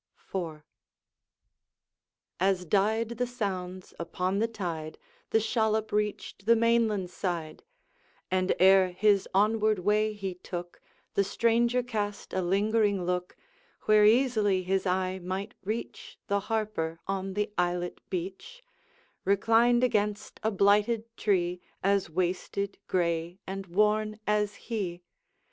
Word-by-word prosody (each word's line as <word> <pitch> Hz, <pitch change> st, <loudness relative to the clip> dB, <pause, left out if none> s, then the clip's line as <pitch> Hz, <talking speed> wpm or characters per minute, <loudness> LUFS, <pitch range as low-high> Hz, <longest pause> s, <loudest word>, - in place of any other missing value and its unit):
IV. 165 Hz, -5 st, -4 dB, 1.8 s
As 185 Hz, -1 st, +1 dB
died 215 Hz, +5 st, +2 dB
the 250 Hz, -, +1 dB
sounds 185 Hz, -6 st, -4 dB
upon 180 Hz, +3 st, -1 dB
the 225 Hz, -, +2 dB
tide, 170 Hz, -8 st, -5 dB, 0.3 s
The 220 Hz, -, +3 dB
shallop 220 Hz, -1 st, 0 dB
reached 210 Hz, -1 st, -2 dB
the 230 Hz, -, +7 dB
mainland 225 Hz, -5 st, +2 dB
side, 170 Hz, -5 st, -4 dB, 0.7 s
And 185 Hz, 0 st, +2 dB
ere 190 Hz, -1 st, +5 dB
his 200 Hz, +1 st, +3 dB
onward 215 Hz, +2 st, +3 dB
way 210 Hz, +3 st, +1 dB
he 195 Hz, -3 st, -4 dB
took, 175 Hz, -1 st, -7 dB, 0.3 s
The 200 Hz, -, +3 dB
stranger 235 Hz, +4 st, +2 dB
cast 210 Hz, -4 st, -4 dB
a 190 Hz, -, +1 dB
lingering 200 Hz, +1 st, +1 dB
look, 180 Hz, 0 st, -2 dB, 0.5 s
Where 215 Hz, 0 st, +5 dB
easily 215 Hz, -4 st, +3 dB
his 190 Hz, +1 st, 0 dB
eye 185 Hz, +1 st, 0 dB
might 185 Hz, +2 st, -4 dB
reach 215 Hz, +4 st, -5 dB
The 200 Hz, 0 st, +1 dB
Harper 210 Hz, -7 st, -1 dB
on 195 Hz, -1 st, -3 dB
the 210 Hz, 0 st, -1 dB
islet 175 Hz, 0 st, -1 dB
beach, 195 Hz, -, -6 dB, 0.6 s
Reclined 230 Hz, +5 st, +3 dB
against 210 Hz, -3 st, 0 dB
a 220 Hz, -, +1 dB
blighted 210 Hz, +3 st, +2 dB
tree, 180 Hz, -5 st, 0 dB, 0.2 s
As 200 Hz, -2 st, +2 dB
wasted, 185 Hz, +4 st, -2 dB
gray, 170 Hz, -1 st, 0 dB
and 195 Hz, 0 st, -5 dB
worn 215 Hz, +3 st, +1 dB
as 210 Hz, -1 st, +1 dB
he. 185 Hz, -7 st, -4 dB
200 Hz, 120 wpm, -29 LUFS, 185-215 Hz, 1.8 s, the